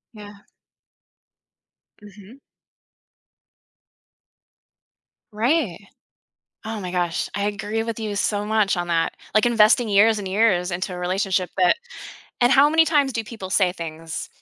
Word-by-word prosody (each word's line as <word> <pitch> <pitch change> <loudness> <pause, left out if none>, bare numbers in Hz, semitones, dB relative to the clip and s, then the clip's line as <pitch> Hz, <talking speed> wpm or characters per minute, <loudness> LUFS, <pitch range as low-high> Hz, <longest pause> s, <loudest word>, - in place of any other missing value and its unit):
Yeah. 205 -1 -13 1.6
Mhm. 210 +4 -15 2.9
Right. 230 - 0 0.9
Oh 220 0 -5
my 180 -1 -5
gosh, 175 -2 -2
I 200 - -2
agree 210 +2 -2
with 230 -1 -5
you 215 -2 -4
so 205 0 -1
much 210 -2 +1
on 175 0 -3
that, 165 -1 0 0.2
like, 215 +2 +4
investing 230 +1 +4
years 210 +2 +4
and 195 -2 -5
years 190 -3 +1
into 185 +2 -4
a - - -7
relationship, 185 0 -1
that 180 -1 +4 0.7
And 245 +1 +4
how 275 +2 +6
many 325 +1 +4
times 290 -4 +1
do 225 - -2
people 215 -4 -9
say 190 -2 +2
things 165 -1 -7
205 Hz, 130 wpm, -22 LUFS, 185-225 Hz, 2.9 s, how